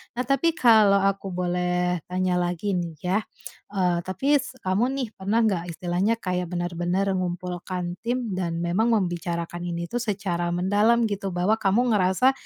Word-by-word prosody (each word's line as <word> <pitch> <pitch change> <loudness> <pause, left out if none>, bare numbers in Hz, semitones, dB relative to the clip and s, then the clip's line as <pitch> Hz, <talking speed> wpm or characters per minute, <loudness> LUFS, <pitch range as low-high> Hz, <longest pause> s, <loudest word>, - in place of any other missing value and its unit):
Nah 250 - -1
tapi 295 +6 +1
kalau 215 -7 +5
aku 195 0 0
boleh 180 -1 0
tanya 180 0 0
lagi 175 +3 -1
nih 170 -3 -2
ya, 185 +3 +2 0.6
eee, 180 -2 +2
tapi 270 +12 +1
s 260 0 -7
kamu 190 +6 +2
nih 260 -3 -2
pernah 215 +4 0
nggak 175 -5 -1
istilahnya 185 +5 0
kayak 180 -1 -1
benar-benar 175 +2 -1
mengumpulkan 180 0 -3
tim, 240 -1 -2
dan 170 -2 -2
memang 185 +7 +1
membicarakan 175 -2 -2
ini 170 0 -4
tuh 245 - -1
secara 195 -6 -2
mendalam 205 +6 +3
gitu 200 -3 -2
bahwa 205 +5 +2
kamu 225 +5 +2
ngerasa, 200 +6 +3
185 Hz, 155 wpm, -25 LUFS, 175-215 Hz, 0.6 s, kalau